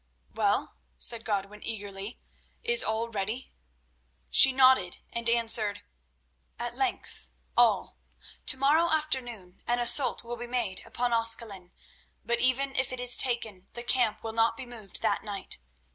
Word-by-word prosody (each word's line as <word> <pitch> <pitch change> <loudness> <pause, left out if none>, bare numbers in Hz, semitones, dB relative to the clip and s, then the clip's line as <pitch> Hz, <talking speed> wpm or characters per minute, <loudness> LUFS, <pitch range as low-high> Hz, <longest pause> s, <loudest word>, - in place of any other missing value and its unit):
"Well," - - -1 0.2
said 230 -1 +7
Godwin 205 0 -4
eagerly, 205 -1 -4 0.5
"is 475 +1 +3
all 225 +1 -2
ready?" 220 +4 -5 0.8
She 270 - +8
nodded 255 -9 +3 0.2
and 235 0 0
answered: 225 -3 +1 0.7
"At - - -5
length, 60 - -4 0.3
all. - - +1 0.5
To - - +5
morrow 305 +5 +2
afternoon 245 -12 -3
an 240 - +1
assault 245 +2 +4
will 240 +1 -7
be 240 +1 -7
made 235 -6 -3
upon 245 0 -2
Ascalon, 225 -5 +1 0.5
but 235 0 0
even 260 +2 +1
if 260 -1 -1
it 255 - -3
is 245 0 +2
taken 220 -7 0
the 240 - -4
camp 240 -3 +1
will 225 -1 -4
not 225 0 +1
be 265 - -8
moved 225 -5 -8
that - - 0
night. 200 - -4
235 Hz, 145 wpm, -27 LUFS, 210-250 Hz, 0.8 s, She